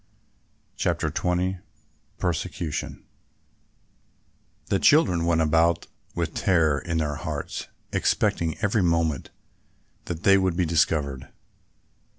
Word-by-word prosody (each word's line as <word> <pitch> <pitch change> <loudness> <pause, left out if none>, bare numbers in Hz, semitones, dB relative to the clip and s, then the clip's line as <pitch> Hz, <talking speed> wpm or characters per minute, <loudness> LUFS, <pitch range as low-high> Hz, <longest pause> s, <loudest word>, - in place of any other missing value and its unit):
CHAPTER - - 0
XX 90 +1 -1 0.6
PERSECUTION 85 -2 -3 1.6
The - - 0
children 90 - +4
went 85 -1 +3
about 80 +2 +2 0.3
with 85 -2 -2
terror 80 -8 +2
in 85 -2 -3
their 75 -2 -1
hearts 80 -4 -5 0.3
expecting 80 -2 +1
every 105 +1 +2
moment 85 -5 0 0.8
that 85 +1 -5
they 100 -1 +6
would 95 -2 0
be 90 - +2
discovered. 75 -5 0
85 Hz, 100 wpm, -25 LUFS, 80-90 Hz, 1.6 s, they